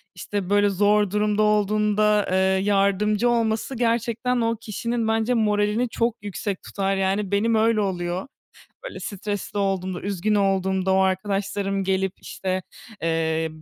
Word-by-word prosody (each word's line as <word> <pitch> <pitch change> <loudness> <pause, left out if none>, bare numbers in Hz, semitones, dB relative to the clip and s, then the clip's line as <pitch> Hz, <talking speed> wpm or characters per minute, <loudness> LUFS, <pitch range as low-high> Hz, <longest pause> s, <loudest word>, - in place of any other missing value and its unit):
işte, 190 +1 -4
böyle 205 0 +4
zor 205 +1 +2
durumda 210 0 +1
olduğunda, 210 0 +2
eee, 185 - +2 0.3
yardımcı 205 +3 +2
olması 230 +2 0
gerçekten 235 +1 0
o 230 0 +1
kişinin 230 +2 -2
bence 225 +2 +1
moralini 210 +1 +1
çok 230 0 0
yüksek 200 -1 -4
tutar. 195 0 -1
Yani, 195 +1 0
benim 220 +3 +2
öyle 220 0 +3
oluyor. 180 +1 -2 0.6
Böyle - - -7
stresli 205 0 -4
olduğumda, 190 -2 -1
üzgün 200 +1 -1
olduğumda 190 -1 +1
o 190 - +3
arkadaşlarım 195 +1 -1
gelip 190 0 0
işte, 185 0 -3 0.4
eee, 160 -1 0
205 Hz, 130 wpm, -23 LUFS, 190-215 Hz, 0.6 s, böyle